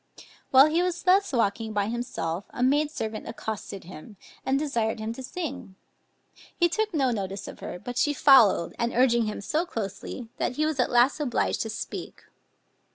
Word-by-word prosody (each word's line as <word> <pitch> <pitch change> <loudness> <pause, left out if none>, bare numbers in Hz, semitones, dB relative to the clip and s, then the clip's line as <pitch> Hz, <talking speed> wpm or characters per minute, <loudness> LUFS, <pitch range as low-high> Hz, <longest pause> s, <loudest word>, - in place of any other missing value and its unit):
While 265 +1 +8
he 315 +3 +2
was 360 -1 -2
thus 385 +2 +4
walking 225 -2 0
by 205 -1 +1
himself, 200 -7 -3
a 245 - -3
maid 290 +3 +3
servant 220 -7 -5
accosted 215 -3 -6
him, 185 +4 -12 0.3
and 265 +1 +1
desired 235 -7 -1
him 220 +1 -3
to 265 - -8
sing; 265 - -6 0.8
he 345 - +4
took 435 +4 -1
no 270 -6 +1
notice 195 -3 -4
of - - -9
her, - - -6
but 245 +7 -5
she 295 - +3
followed 265 - +5
and 235 +1 -1
urging 235 -2 +4
him 210 - -4
so 310 - 0
closely, 225 - -6
that - - -1
he 305 - +1
was 310 -3 -2
at 250 - +2
last 245 +5 +3
obliged 275 -5 0
to 220 - -3
speak. 215 - -6
245 Hz, 180 wpm, -26 LUFS, 215-295 Hz, 0.8 s, While